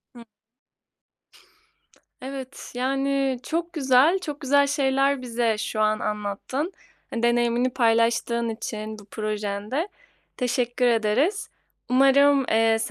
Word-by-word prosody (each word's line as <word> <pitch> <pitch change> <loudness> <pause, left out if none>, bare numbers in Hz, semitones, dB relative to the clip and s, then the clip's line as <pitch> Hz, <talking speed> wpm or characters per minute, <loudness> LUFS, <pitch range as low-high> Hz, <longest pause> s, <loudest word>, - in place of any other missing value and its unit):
Hı. 235 - -11 2.0
Evet. 265 0 -8
Yani, 270 0 0
çok 335 +1 -3
güzel, 280 +4 +4
çok 295 -5 -6
güzel 285 0 +3
şeyler 275 -1 +1
bize 235 -3 0
şu 215 - -4
an 215 0 +2
anlattın. 210 - -3 0.4
Hani, 235 - -4
deneyimini 240 +1 +2
paylaştığın 235 0 +1
için 215 -1 -5
bu 205 - -15
projende 215 - -3 0.5
teşekkür 245 0 0
ederiz. 240 - +1 0.4
Umarım, 275 +2 +5
eee, 225 0 +3
250 Hz, 100 wpm, -24 LUFS, 225-275 Hz, 2.0 s, Umarım